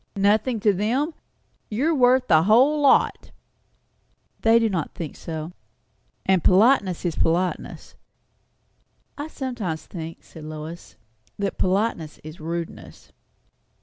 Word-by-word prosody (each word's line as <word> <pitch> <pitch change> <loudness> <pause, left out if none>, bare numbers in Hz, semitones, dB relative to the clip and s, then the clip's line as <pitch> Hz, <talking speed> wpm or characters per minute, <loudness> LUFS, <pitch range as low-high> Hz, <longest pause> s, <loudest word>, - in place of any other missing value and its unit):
"Nothing 215 +4 +2
to 210 -1 +4
them! 245 - 0 0.6
You 250 +9 0
are - - +2
worth 255 -2 +3
the 155 -2 +5
whole 255 - +4
lot." 280 - +3 1.1
"They 225 +1 +4
do 230 -1 +3
not 180 -7 -3
think 160 -4 -6
so." 160 0 -6 0.7
"And 190 -3 +2
politeness 195 -3 +3
is 170 - 0
politeness." 175 +2 -1 1.2
"I 290 +1 -5
sometimes 240 - -4
think," 165 -2 -8
said 160 - -13
Lois, 155 +2 -8 0.4
"that 200 -1 -3
politeness 185 -5 -1
is 155 +2 -10
rudeness." 165 +1 -7
195 Hz, 115 wpm, -23 LUFS, 165-245 Hz, 1.2 s, the